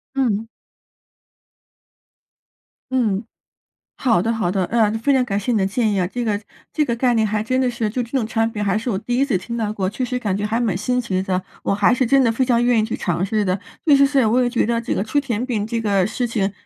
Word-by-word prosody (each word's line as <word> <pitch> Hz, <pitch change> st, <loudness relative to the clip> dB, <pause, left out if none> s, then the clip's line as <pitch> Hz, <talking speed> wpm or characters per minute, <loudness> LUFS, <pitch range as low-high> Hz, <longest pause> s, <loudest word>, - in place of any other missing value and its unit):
嗯。 225 Hz, -5 st, 0 dB, 2.4 s
嗯， 225 Hz, -5 st, 0 dB, 0.7 s
好 230 Hz, -9 st, +2 dB
的 225 Hz, +4 st, 0 dB
好 225 Hz, -6 st, 0 dB
的， 190 Hz, -2 st, 0 dB
呃， 225 Hz, -3 st, +2 dB
非 285 Hz, -, +1 dB
常 255 Hz, -1 st, +3 dB
感 200 Hz, -3 st, -2 dB
谢 210 Hz, -, -2 dB
你 230 Hz, -, +2 dB
的 190 Hz, -2 st, +2 dB
建 220 Hz, +2 st, 0 dB
议 200 Hz, -, 0 dB
啊， 180 Hz, -, +1 dB
这 245 Hz, +6 st, -4 dB
个 210 Hz, -3 st, 0 dB, 0.3 s
这 305 Hz, -, +1 dB
个 235 Hz, -, -1 dB
概 245 Hz, +1 st, +1 dB
念 220 Hz, -1 st, +2 dB
还 210 Hz, 0 st, -1 dB
真 255 Hz, +3 st, -1 dB
的 255 Hz, -1 st, +2 dB
是 235 Hz, -2 st, -2 dB
就 245 Hz, +4 st, -2 dB
这 235 Hz, -, -9 dB
种 260 Hz, -5 st, 0 dB
产 225 Hz, 0 st, 0 dB
品， 210 Hz, -1 st, -3 dB
还 195 Hz, 0 st, +1 dB
是 230 Hz, +3 st, -2 dB
我 190 Hz, -, -1 dB
第 245 Hz, +4 st, -2 dB
1 275 Hz, -, +3 dB
次 240 Hz, -10 st, 0 dB
听 235 Hz, +5 st, -6 dB
到 215 Hz, -2 st, -1 dB
过， 190 Hz, -3 st, -2 dB
确 215 Hz, +6 st, -3 dB
实 250 Hz, +1 st, -2 dB
感 205 Hz, -6 st, -1 dB
觉 205 Hz, -, -3 dB
还 225 Hz, +3 st, 0 dB
蛮 215 Hz, -7 st, 0 dB
新 250 Hz, +6 st, 0 dB
奇 190 Hz, -6 st, -1 dB
的， 185 Hz, -1 st, -1 dB, 0.2 s
我 195 Hz, -, 0 dB
还 205 Hz, +4 st, +3 dB
是 255 Hz, -, +1 dB
真 270 Hz, +2 st, +4 dB
的 230 Hz, -, +3 dB
非 255 Hz, +3 st, +1 dB
常 240 Hz, -2 st, +2 dB
愿 240 Hz, -2 st, +3 dB
意 215 Hz, -, +2 dB
去 220 Hz, -, -4 dB
尝 175 Hz, +1 st, -1 dB
试 210 Hz, +1 st, 0 dB
的。 185 Hz, 0 st, 0 dB, 0.3 s
确 290 Hz, -2 st, +6 dB
实 275 Hz, 0 st, +5 dB
是， 270 Hz, -4 st, +2 dB
我 245 Hz, +4 st, +3 dB
也 245 Hz, -, +1 dB
觉 240 Hz, -3 st, +1 dB
得 235 Hz, 0 st, 0 dB
这 230 Hz, -, -2 dB
个 -, -, 0 dB
吃 225 Hz, +7 st, -1 dB
甜 250 Hz, -3 st, -1 dB
品 215 Hz, -5 st, -1 dB
这 230 Hz, 0 st, -2 dB
个 200 Hz, -4 st, +2 dB
事 245 Hz, +3 st, -2 dB
情， 205 Hz, -4 st, -1 dB
225 Hz, 275 characters per minute, -21 LUFS, 205-245 Hz, 2.4 s, 确